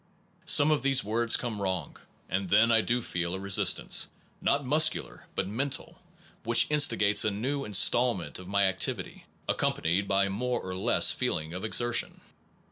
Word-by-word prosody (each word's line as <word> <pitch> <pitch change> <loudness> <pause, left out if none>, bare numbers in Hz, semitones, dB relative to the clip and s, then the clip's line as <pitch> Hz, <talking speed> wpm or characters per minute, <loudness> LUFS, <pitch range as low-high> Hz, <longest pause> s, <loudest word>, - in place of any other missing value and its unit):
Some 145 +2 +5
of 150 - +1
the 135 0 0
words 115 +2 +1
come 110 -4 -5
wrong, 95 -2 -4 0.3
and 95 0 -3
then 115 +5 +4
I 115 -1 +4
do 120 +2 -2
feel 85 -2 -3
a - - -6
resistance, 100 0 +1 0.3
not 140 0 0
muscular 155 +4 0
but - - -2
mental, 130 +7 -4 0.4
which 115 +1 +3
instigates 115 -9 +3
a 110 - +1
new 130 +8 -3
instalment 105 -1 +2
of 90 - -12
my 100 +1 +1
activity, 95 -1 -2 0.2
accompanied 90 +5 -1
by 100 0 +1
more 120 +5 -3
or 95 - -7
less 95 - +3
feeling 80 +1 -3
of 90 - -7
exertion. 120 +2 0
105 Hz, 155 wpm, -27 LUFS, 95-125 Hz, 0.4 s, Some